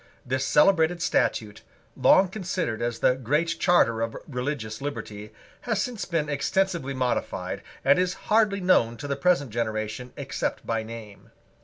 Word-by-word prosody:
This 130 +1 -1
celebrated 170 +1 +4
statute, 110 -10 0 0.3
long 190 - +5
considered 180 - -3
as 120 0 -1
the - - +3
Great 150 +7 -1
Charter 115 -11 +3
of 115 -1 -2
religious 125 -4 -4
liberty, 105 -7 -6 0.4
has 220 -3 +1
since 235 0 -3
been 165 -4 -1
extensively 150 0 0
modified, 125 -1 -2 0.2
and 140 +5 +5
is 185 0 0 0.2
hardly 210 -2 +3
known 120 -11 +3
to 145 - -6
the 140 - -1
present 140 -4 +1
generation 110 +2 -3
except - - -3
by 115 -1 -1
name. 110 -2 -10
140 Hz, 145 wpm, -26 LUFS, 115-175 Hz, 0.4 s, long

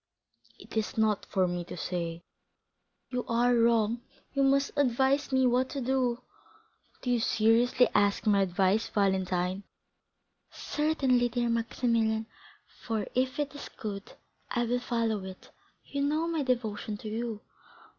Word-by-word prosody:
"It - - -13
is 220 0 -1
not 215 -2 +1
for 185 -1 +1
me 175 0 -3
to - - -8
say." 170 -1 -3 0.9
"You 250 -1 -1
are 240 +1 +3
wrong; 230 -1 +3 0.3
you 275 - +1
must 275 +1 +3
advise 270 +1 +2
me 260 -1 +3
what 250 +1 +2
to 280 - -4
do." 255 -1 0 0.8
"Do 250 - 0
you 240 - +3
seriously 230 +3 +3
ask 205 +1 +2
my 205 -2 +4
advice, 190 +3 +2
Valentine?" 190 -2 0 0.9
"Certainly, 270 -5 +1
dear 240 0 0
Maximilian, 230 -1 0 0.6
for 220 -3 -2
if 255 +1 0
it 295 -1 -2
is 285 - -8
good, 200 -2 -7 0.4
I 240 - 0
will 245 +1 0
follow 230 -4 -1
it; 190 0 -10 0.3
you 280 - -4
know 305 +4 +1
my 330 -2 -1
devotion 225 -5 -2
to 215 - -9
you." 220 0 -3
230 Hz, 140 wpm, -29 LUFS, 210-255 Hz, 0.9 s, my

